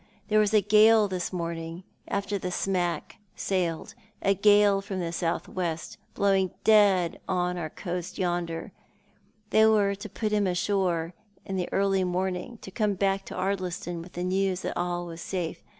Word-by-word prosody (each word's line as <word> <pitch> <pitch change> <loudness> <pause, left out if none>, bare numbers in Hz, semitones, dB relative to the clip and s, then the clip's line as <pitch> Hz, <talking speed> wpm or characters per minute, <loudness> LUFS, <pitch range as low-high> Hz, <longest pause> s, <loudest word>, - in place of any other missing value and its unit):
There 215 0 +4
was 210 -1 +3
a 215 -1 +5
gale 215 +1 +6
this 185 -2 -3
morning, 170 0 -4 0.2
after 200 0 -2
the 180 - -3
smack 180 +1 -1 0.2
sailed 175 -4 -2 0.2
— - - -39
a 195 - +4
gale 205 0 +5
from 195 -1 -5
the 170 -2 -2
south 170 -1 -2
west, 170 -3 -4 0.2
blowing 195 -2 +2
dead 200 -6 +4
on 180 -1 0
our 165 -3 -4
coast 175 +2 -5
yonder. 175 -2 -2 0.8
They 220 0 +6
were 205 -2 +3
to 200 +2 -8
put 215 +2 -3
him 205 -2 +2
ashore 180 -2 0 0.3
in 195 - -4
the 180 -2 -2
early 195 -1 +2
morn 185 +1 0
ing, 180 - -6
and 235 - -14
to 190 - -8
come 210 0 0
back 195 0 0
to - - -8
Ardliston 180 -3 -2
with 175 +2 -12
the 175 - -4
news 185 0 0
that - - -3
all 175 0 -2
was 170 -1 -8
safe. 175 -4 -4
185 Hz, 180 wpm, -27 LUFS, 175-200 Hz, 0.8 s, gale